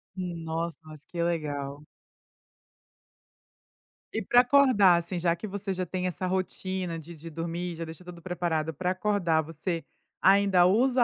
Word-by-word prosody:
Nossa, 170 -2 -3
mas 155 -1 -12
que 170 -1 -4
legal. 145 -4 -2 2.3
E 220 - 0
pra 245 +5 +6
acordar, 245 -9 +5
assim, 170 +1 -3
já 170 0 +2
que 215 - -7
você 200 0 -3
já 185 0 -2
tem 185 +1 -3
essa 180 +1 -2
rotina 185 -2 -2
de 165 +2 -10
de 165 +2 -9
dormir 170 +2 -3
e - - -8
já 165 - -5
deixa 160 +3 -10
tudo 175 -1 -10
preparado, 165 -3 -1
pra 180 +4 -1
acordar 185 -4 +1
você 165 +1 -4 0.4
ainda 195 -2 +5
usa 245 +5 +4
175 Hz, 150 wpm, -28 LUFS, 165-190 Hz, 2.3 s, pra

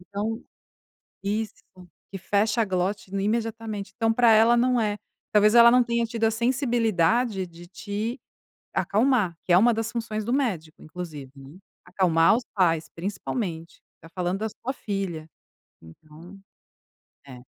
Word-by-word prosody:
então, 205 +5 -4 0.8
isso 210 +2 -3 0.5
e - - -4
fecha 210 +4 +1
a - - +1
glote 190 +1 -2
imediatamente, 215 0 -3
então 225 -1 +1
para 235 0 +4
ela 225 +2 +5
não 250 +1 +2
é, 210 -1 -1 0.3
talvez 210 +1 +4
ela 235 0 +8
não 250 0 +5
tenha 235 -1 0
tido 230 0 -5
a 220 - +3
sensibilidade 230 - +1
de 170 0 -14
te 205 +7 -5 0.5
acalmar, 215 -6 +1
que 180 - +1
é - - +8
uma 235 +5 +5
das 225 +1 -3
funções 220 -2 -4
do 240 - -1
médico 190 - -2
inclusive, 155 -5 -8
né. 135 +4 -13 0.3
Acalmar 165 0 +3
os 250 - -4
pais 165 -5 +1
principalmente, 180 -2 -5 0.2
está 165 - -16
falando 180 +2 -2
da 220 +1 -2
sua 255 +5 -6
filha, 190 - -5 0.5
então, 155 - -15 0.9
é. 125 -2 -12
205 Hz, 145 wpm, -25 LUFS, 180-230 Hz, 0.9 s, ela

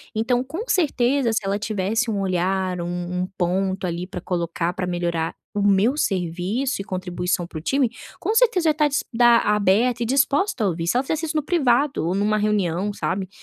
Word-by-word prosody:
Então, 245 +3 +1
com 320 - -5
certeza, 270 - +2
se 215 -2 -1
ela 200 +1 0
tivesse 215 +3 -1
um 205 - -1
olhar, 185 0 0
um 175 +1 -3 0.2
um - - -3
ponto, 190 +1 0
ali, 175 +1 -3
pra 180 -2 -7
colocar 170 -1 -2
pra 180 - -3
melhorar 170 -2 -2 0.2
o 205 - 0
meu 205 +6 +3
serviço 195 - -1
e - - -5
contribuição 180 -2 -2
para 160 -2 -7
o - - -11
time, 265 - +1 0.3
com 435 - -1
certeza 450 -8 +3
eu - - +6
ia - - -1
tá 300 0 +2
dis 285 - -1
dá 240 0 +6
aberta 210 +4 +2
e - - +1
disposta 275 - +1
a 200 - +3
ouvir, 165 -1 -2
se 240 - +2
ela 260 - +2
fizesse 320 +3 -2
isso 310 - -4
no 300 - 0
privado 275 - +1
ou 180 - 0
numa 210 +1 +1
reunião, 205 -2 0
sabe, 190 -1 -3
205 Hz, 205 wpm, -22 LUFS, 180-255 Hz, 0.3 s, eu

